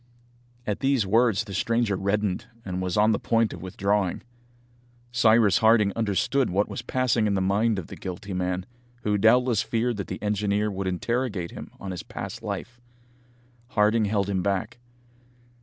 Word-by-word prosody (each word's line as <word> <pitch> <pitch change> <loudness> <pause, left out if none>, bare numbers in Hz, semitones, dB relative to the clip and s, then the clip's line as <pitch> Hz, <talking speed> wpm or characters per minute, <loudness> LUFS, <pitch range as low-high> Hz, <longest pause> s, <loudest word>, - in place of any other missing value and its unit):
At 105 -1 -2
these 135 -5 +2
words 110 0 +3
the 100 - -9
stranger 115 +1 +1
reddened, 100 +1 -1 0.2
and 90 -1 -3
was 90 0 -2
on 105 +1 +5
the 105 - +1
point 115 -1 +1
of 85 - -9
withdrawing. 95 +1 -1 0.9
Cyrus 115 -4 +4
Harding 110 -3 +4
understood 115 +4 +1
what 100 +3 +1
was - - -5
passing 125 -4 +1
in 100 - +1
the - - +1
mind 100 +4 +1
of 95 - -4
the - - -9
guilty 95 +1 -6
man, 90 0 -2 0.4
who 105 0 +1
doubtless 120 +1 +4
feared 115 0 -1
that 100 - -4
the 95 - -5
engineer 105 0 0
would 95 0 -3
interrogate 100 -1 -2
him - - -8
on 95 - -6
his 90 - -5
past - - -7
life. 120 0 -6 0.9
Harding 110 -1 +2
held 100 -1 0
him 95 -2 0
back. 100 +5 -2
105 Hz, 165 wpm, -26 LUFS, 95-115 Hz, 0.9 s, on